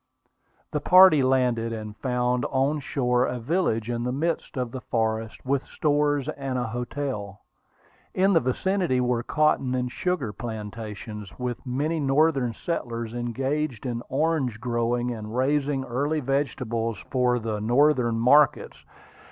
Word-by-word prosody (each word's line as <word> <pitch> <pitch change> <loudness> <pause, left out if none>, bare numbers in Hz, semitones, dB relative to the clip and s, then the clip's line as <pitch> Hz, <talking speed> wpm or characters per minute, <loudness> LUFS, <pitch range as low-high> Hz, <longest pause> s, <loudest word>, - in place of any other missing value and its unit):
The 150 - 0
party 185 -3 +7
landed, 125 -3 +1
and 110 -2 -6
found 125 +1 0
on 140 +3 +1
shore 125 -3 +1
a 125 - -3
village 120 - 0
in 120 -1 -2
the 125 - -1
midst 160 +2 -2
of 125 -2 -2
the 130 - -6
forest, 110 -2 -2
with 135 0 0
stores 145 -2 +1
and 135 -4 -3
a 125 - -1
hotel. 120 -4 -4 0.7
In 195 +2 +3
the 165 - +6
vicinity 165 +2 0
were 125 -1 +1
cotton 135 -2 +1
and 125 -1 -2
sugar 150 - -2
plantations, 105 -2 -7
with 125 -2 -4
many 150 +6 -1
Northern 135 -4 +2
settlers 115 -9 -4
engaged 130 +3 -2
in 120 -2 -2
orange 140 -5 0
growing 120 0 -1
and 110 0 -6
raising 140 +1 +1
early 140 +5 -1
vegetables 125 -5 -1
for 125 -2 +2
the 110 -2 -3
Northern 120 0 +3
markets. 135 +4 +3
125 Hz, 135 wpm, -25 LUFS, 115-145 Hz, 0.7 s, party